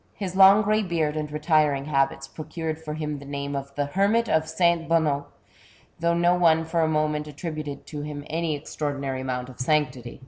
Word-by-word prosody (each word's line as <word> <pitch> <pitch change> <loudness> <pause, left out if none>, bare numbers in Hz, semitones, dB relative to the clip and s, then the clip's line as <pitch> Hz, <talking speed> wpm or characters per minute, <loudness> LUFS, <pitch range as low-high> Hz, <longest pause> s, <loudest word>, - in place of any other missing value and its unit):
His 190 -3 -5
long 195 +2 +7
grey 215 +1 +2
beard 165 -6 -1
and 150 -1 -3
retiring 150 -2 +2
habits 135 -2 0
pro 155 +2 -9
cured 160 0 -4
for 150 -1 -5
him 150 -2 -4
the - - -11
name 140 0 -4
of 140 0 -5
the 145 - 0
Hermit 200 +9 +2
of 160 0 +1
St. 170 0 +1
Bonnot, 150 -4 +1 0.7
though 170 +1 +2
no 175 +1 +3
one 165 -2 +3
for 165 +1 0
a 160 - +3
moment 150 -1 0
attributed 150 -1 -6
to 150 -2 -6
him 145 -1 -6
any 160 0 -1
extraordinary 140 -3 -4
amount 125 -1 -3
of 125 - -13
sanctity. 130 -4 -1
155 Hz, 195 wpm, -25 LUFS, 140-165 Hz, 0.7 s, long